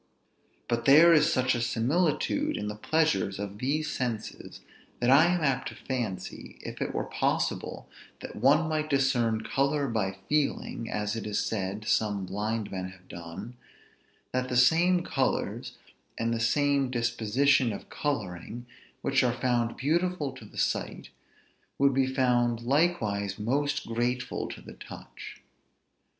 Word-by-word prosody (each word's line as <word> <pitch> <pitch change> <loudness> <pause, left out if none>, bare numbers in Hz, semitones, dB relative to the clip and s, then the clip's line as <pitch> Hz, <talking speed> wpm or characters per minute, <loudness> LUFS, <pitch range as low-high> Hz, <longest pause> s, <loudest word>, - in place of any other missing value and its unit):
But 115 0 -1
there 160 +5 +8
is 150 -1 +5
such 130 -1 +2
a 120 - -1
similitude 155 - +1
in 105 - -3
the 105 - -5
pleasures 105 - +1
of 100 0 -6
these 150 +5 0
senses, 115 -4 -4 0.4
that 120 +1 +3
I 145 +4 +7
am 175 0 +1
apt 135 -3 +1
to - - -7
fancy, 120 -8 -5
if - - -7
it - - -1
were - - -2
possible - - -2 0.3
that - - -8
one 145 +8 +4
might 155 -1 -1
discern 125 -5 +2
color 140 +1 0
by 100 -5 -1
feeling 145 -5 -1
(as 105 +1 -2
it 115 - -4
is 105 - -2
said 100 0 -2
some 105 -3 +1
blind 105 +3 -3
men 95 -1 -4
have 95 -1 -17
done) 85 +8 -8 0.7
that 130 0 -1
the 125 - 0
same 170 +7 +4
colors, 135 -5 -1 0.4
and 115 +1 0
the 115 - -1
same 140 +3 +2
disposition 120 +2 +2
of 100 - -8
coloring, 110 - -3 0.4
which 135 0 +2
are 125 0 0
found 120 -2 0
beautiful 160 +1 0
to 130 -4 -12
the - - -14
sight, - - -2 0.7
would 140 0 +4
be 130 0 +2
found 120 -3 +1
likewise 120 - +1
most 140 +7 -1
grateful 120 +2 -2
to - - -8
the - - -11
touch. - - -11
125 Hz, 145 wpm, -28 LUFS, 110-140 Hz, 0.7 s, there